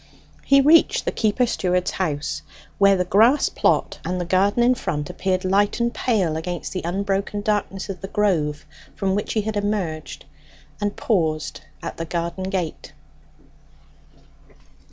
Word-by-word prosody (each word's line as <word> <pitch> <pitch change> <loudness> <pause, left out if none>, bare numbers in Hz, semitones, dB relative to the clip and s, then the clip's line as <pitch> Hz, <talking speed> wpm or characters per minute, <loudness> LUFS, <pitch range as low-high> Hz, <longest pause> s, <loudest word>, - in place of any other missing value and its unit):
He 275 0 +5
reached 330 - +4
the - - 0
keeper 220 +3 +1
steward's 180 -5 0
house, 150 -3 -2 0.4
where 200 -1 +5
the 180 - 0
grass 225 +10 +4
plot - - +1
and 180 0 -2
the 175 - -2
garden 195 +6 +2
in 250 +1 +5
front 175 -9 -3
appeared 185 +1 -1
light 200 +4 +2
and 235 0 0
pale 195 -10 0
against 175 +2 -4
the 185 - -3
unbroken 195 +3 -1
darkness 205 -2 -1
of 195 -2 -6
the 195 - -5
grove 160 -8 0 0.3
from 190 -1 0
which 205 +1 -2
he 220 - +1
had 215 +1 -4
emerged, 200 -10 -3 0.6
and 205 0 -1
paused 155 -7 -1 0.2
at - - -5
the 165 - -3
garden 170 +3 -3
gate. 185 -4 -4
190 Hz, 150 wpm, -22 LUFS, 170-210 Hz, 0.6 s, He